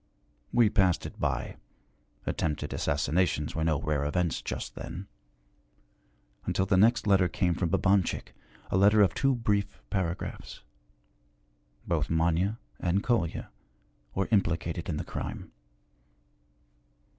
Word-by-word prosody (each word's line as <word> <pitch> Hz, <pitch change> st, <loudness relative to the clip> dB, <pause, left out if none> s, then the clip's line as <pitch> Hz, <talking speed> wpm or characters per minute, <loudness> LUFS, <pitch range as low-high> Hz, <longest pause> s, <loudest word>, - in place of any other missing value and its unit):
We 115 Hz, -4 st, +4 dB
passed 95 Hz, -3 st, +2 dB
it -, -, -8 dB
by -, -, -2 dB, 0.7 s
attempted 75 Hz, -2 st, -2 dB
assassinations 75 Hz, +1 st, 0 dB
were 80 Hz, -, -1 dB
no 80 Hz, -3 st, +2 dB
rare 75 Hz, -2 st, -1 dB
events 80 Hz, +3 st, 0 dB
just -, -, -5 dB
then 95 Hz, +3 st, -7 dB, 1.4 s
until 95 Hz, -, 0 dB
the 95 Hz, -, +2 dB
next 110 Hz, +5 st, +4 dB
letter 95 Hz, -3 st, +4 dB
came 90 Hz, +1 st, 0 dB
from 85 Hz, 0 st, -1 dB
Babanchik, 95 Hz, +1 st, +1 dB, 0.4 s
a -, -, +2 dB
letter 105 Hz, +2 st, +6 dB
of 90 Hz, -4 st, +2 dB
two 135 Hz, +5 st, +2 dB
brief 105 Hz, -4 st, -1 dB
paragraphs. 90 Hz, -3 st, -3 dB, 1.2 s
Both 80 Hz, -4 st, 0 dB
Manya 85 Hz, +6 st, +1 dB, 0.2 s
and 90 Hz, +4 st, +1 dB
Kolya 115 Hz, -, 0 dB, 0.6 s
were 95 Hz, -, 0 dB
implicated 85 Hz, -4 st, 0 dB
in 80 Hz, -, -1 dB
the -, -, -4 dB
crime. -, -, -6 dB
90 Hz, 120 wpm, -29 LUFS, 80-100 Hz, 1.4 s, letter